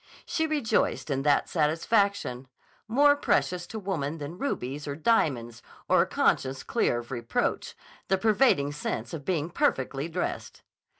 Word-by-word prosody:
She 320 0 0
rejoiced 245 - 0
in 135 -1 0
that 145 0 +2
satisfaction, 165 - 0 0.4
more 285 +6 +5
precious 180 -10 0
to 225 - -7
woman 165 -7 -3
than 155 +4 -7
rubies 145 - -3
or 140 - -3
diamonds 135 - +1 0.3
or - - +5
a - - +1
conscience 130 0 +1
clear 120 - +1
of 120 +2 -7
reproach, 120 -2 -2 0.3
the 190 - +2
pervading 210 - +3
sense 120 -4 -4
of 150 -4 -6
being 170 -2 -1
perfectly 135 +1 0
dressed. 160 - -4
155 Hz, 140 wpm, -27 LUFS, 135-200 Hz, 0.4 s, more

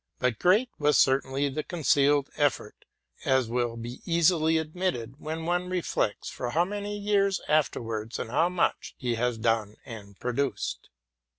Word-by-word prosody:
But 125 -3 0
great 215 +8 +3
was 150 0 +3
certainly 135 +1 +2
the 140 +3 -2
concealed 145 -3 +2
effort, 145 -3 -1 0.4
as 130 -2 +2
will 120 -1 -1
be 120 +2 -7
easily 165 -1 +3
admitted 155 -6 -3
when 160 +1 -5
one 175 +1 0
reflects 175 - -1
for 120 - -4
how 165 +7 +2
many 205 +1 -4
years 200 -2 +1
afterwards, 115 -7 0
and 115 - -5
how 165 +6 +3
much, 180 -1 -1
he 125 -2 -1
has 120 0 0
done 110 -2 0
and 100 -4 -10
produced. 125 -3 -2
145 Hz, 150 wpm, -27 LUFS, 120-175 Hz, 0.4 s, great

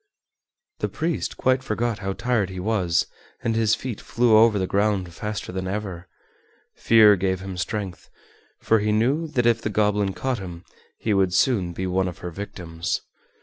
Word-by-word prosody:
The - - -1
priest 165 +1 -2
quite 130 0 +2
forgot 115 -2 -2
how 95 -1 -3
tired 115 -4 0
he 95 -1 -6
was 90 -4 +1 0.4
and 115 -1 0
his 115 -1 +3
feet 125 -4 -6
flew 120 -2 +3
over 110 -1 +6
the 95 - 0
ground 100 -3 0
faster 105 +2 -5
than 95 0 -4
ever. 95 -3 -4 0.7
Fear 110 -2 +6
gave 95 0 -1
him 95 -1 -6
strength, 95 0 -4 0.5
for 110 - +3
he 105 +1 0
knew 130 +10 +1
that 125 -6 0
if 115 -1 +3
the 110 - -2
goblin 105 -2 +1
caught 130 -2 -2
him 90 -2 -8 0.3
he 110 - -1
would 95 -2 +2
soon 95 -6 +2
be 95 +2 -4
one 95 +1 0
of 90 - -6
her 90 - -4
victims. 85 -2 -4
105 Hz, 175 wpm, -24 LUFS, 95-115 Hz, 0.7 s, over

